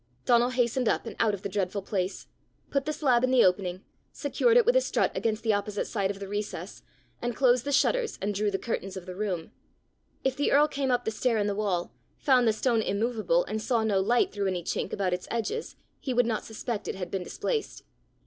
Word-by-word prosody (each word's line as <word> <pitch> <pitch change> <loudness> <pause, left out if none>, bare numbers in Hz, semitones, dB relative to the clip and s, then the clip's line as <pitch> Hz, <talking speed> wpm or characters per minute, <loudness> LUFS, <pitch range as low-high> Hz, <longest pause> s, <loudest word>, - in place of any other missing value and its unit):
Donal 240 0 +4
hastened 250 -1 +1
up, - - 0
and 225 - -6
out 215 -3 +3
of 195 - -13
the - - -1
dreadful 195 0 -2
place, 190 -1 -2 0.5
put 275 -1 0
the 305 - -1
slab 255 -5 +2
in 255 - +3
the 255 -1 +5
opening, 185 0 0 0.3
secured 480 -1 +2
it 480 - +5
with 485 +2 +4
a - - +6
strut - - 0
against 225 0 -1
the 220 -2 +3
opposite 205 0 -1
side 200 -4 -1
of 200 - -3
the 200 - -6
recess, 205 +1 -5 0.4
and 240 -1 -2
closed 250 -1 +3
the 285 - -1
shutters 475 - +2
and 205 +2 -1
drew 205 +1 0
the 195 - -1
curtains 195 -2 -4
of 180 - -8
the 185 - -6
room; 185 -5 -3 0.7
if 265 -1 +1
the 285 - +1
earl 295 +2 +6
came 275 -2 -2
up 245 -1 +1
the 220 - 0
stair 230 +1 +1
in 205 - +1
the 205 - 0
wall, 195 -4 -1 0.2
found 255 -4 +3
the - - +6
stone 225 +1 +1
immovable, 235 - +1
and 220 - -3
saw 230 -1 +1
no 205 -3 +2
light 230 +5 +2
through 200 -1 -1
any 180 -2 -2
chink - - -2
about 190 -3 0
its 180 - -4
edges, 420 - -3 0.2
he 260 -3 -3
would 245 0 +4
not 225 -2 -1
suspect 220 0 -5
it - - -3
had 180 -2 -5
been 195 - -2
displaced! 445 - -3
220 Hz, 230 wpm, -28 LUFS, 200-255 Hz, 0.7 s, a